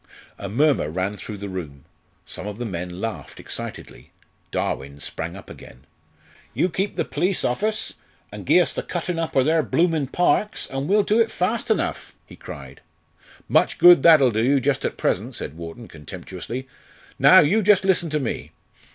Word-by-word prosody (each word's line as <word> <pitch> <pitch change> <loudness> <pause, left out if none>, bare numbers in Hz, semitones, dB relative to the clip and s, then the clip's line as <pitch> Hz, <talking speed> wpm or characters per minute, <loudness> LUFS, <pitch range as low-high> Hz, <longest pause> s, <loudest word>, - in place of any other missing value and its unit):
A 100 - -5
murmur 140 - +2
ran 95 +5 -2
through 105 0 -8
the 100 +1 -6
room. 80 -8 -7 0.4
Some 95 - -5
of 105 -1 -6
the 120 - -4
men 90 -3 -5
laughed 115 +1 -6
excitedly. - - -7 0.4
Darwin 70 +2 -3
sprang 80 +5 -5
up 95 - -12
again. 65 +3 -13 0.7
"You 180 - +2
keep 195 +4 -2
the - - -1
perlice 180 +5 -1
off 125 - -1
us, 215 0 -1 0.4
an' - - -8
gie - - +5
us - - -1
the - - -3
cuttin' 175 -2 -3
up 165 - -3
o' 135 - +5
their 160 +3 +3
bloomin' 160 -3 +1
parks 190 +7 +1
an' 135 +1 -3
we'll 205 +3 +4
do 215 +3 +2
it 225 -1 +3
fast 220 +6 -2
enough," 220 - -1
he - - -14
cried. - - -10 0.7
"Much - - +2
good 175 0 +8
that'll 155 -7 +6
do 110 +1 0
you, 140 +3 +3
just 140 +1 0
at - - -2
present," - - -1
said - - -6
Wharton, 85 +8 -9
contemptuously. 95 - -8 0.5
"Now, - - +8
you 200 +9 +3
just 200 -1 +4
listen 180 -3 +2
to 155 0 0
me." 130 -5 -4
135 Hz, 180 wpm, -23 LUFS, -, 0.7 s, good